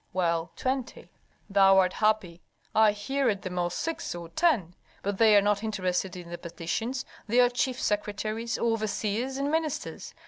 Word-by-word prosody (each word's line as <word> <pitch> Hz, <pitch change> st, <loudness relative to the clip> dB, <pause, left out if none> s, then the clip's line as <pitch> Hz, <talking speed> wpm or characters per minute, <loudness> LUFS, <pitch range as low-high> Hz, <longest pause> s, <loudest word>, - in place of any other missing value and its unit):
"Well, 170 Hz, -2 st, 0 dB
twenty." 260 Hz, -1 st, -3 dB, 0.4 s
"Thou 195 Hz, -1 st, +5 dB
art 185 Hz, -1 st, +4 dB
happy. 215 Hz, -6 st, 0 dB, 0.3 s
I 220 Hz, -1 st, +5 dB
hear 265 Hz, +6 st, 0 dB
at 200 Hz, -3 st, -2 dB
the 185 Hz, -, -4 dB
most 175 Hz, -1 st, -1 dB
six 330 Hz, -, -3 dB
or 170 Hz, -1 st, -7 dB
ten, 245 Hz, -, +1 dB, 0.3 s
but 200 Hz, 0 st, -2 dB
they 220 Hz, -2 st, +7 dB
are 200 Hz, -, +5 dB
not 205 Hz, 0 st, +2 dB
interested 190 Hz, -3 st, -1 dB
in 175 Hz, -1 st, -9 dB
the 175 Hz, -, -6 dB
petitions, 185 Hz, +9 st, -3 dB, 0.2 s
they 235 Hz, +4 st, +3 dB
are 245 Hz, 0 st, +6 dB
chief 250 Hz, +1 st, -1 dB
secretaries, 215 Hz, +3 st, -2 dB
overseers, 225 Hz, +2 st, -1 dB
and 280 Hz, +1 st, -1 dB
ministers. 315 Hz, -2 st, -3 dB
210 Hz, 165 wpm, -28 LUFS, 185-245 Hz, 0.4 s, they